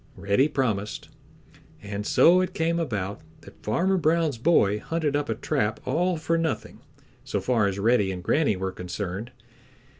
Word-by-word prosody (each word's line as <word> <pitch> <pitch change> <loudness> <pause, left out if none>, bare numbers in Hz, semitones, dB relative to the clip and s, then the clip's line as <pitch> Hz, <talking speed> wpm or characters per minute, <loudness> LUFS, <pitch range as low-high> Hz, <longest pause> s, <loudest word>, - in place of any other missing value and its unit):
Reddy 100 +8 +2
promised, 110 -8 -2 0.7
and 100 0 -5
so 180 +2 +5
it 185 - -3
came 165 +1 0
about 105 - -3 0.2
that - - -16
Farmer 185 - +1
Brown's 160 -6 +1
boy 105 -8 +3
hunted 155 +2 -2
up 145 -3 -1
a 115 - 0
trap 105 0 -1
all 170 +6 +1
for 165 +1 0
nothing 165 -2 -3 0.4
so - - -2
far 115 -5 +1
as 100 -1 -2
Reddy 105 -2 +2
and 90 -1 -6
Granny 145 - +2
were 95 0 -3
concerned. 95 +4 -5
120 Hz, 155 wpm, -25 LUFS, 100-160 Hz, 0.7 s, so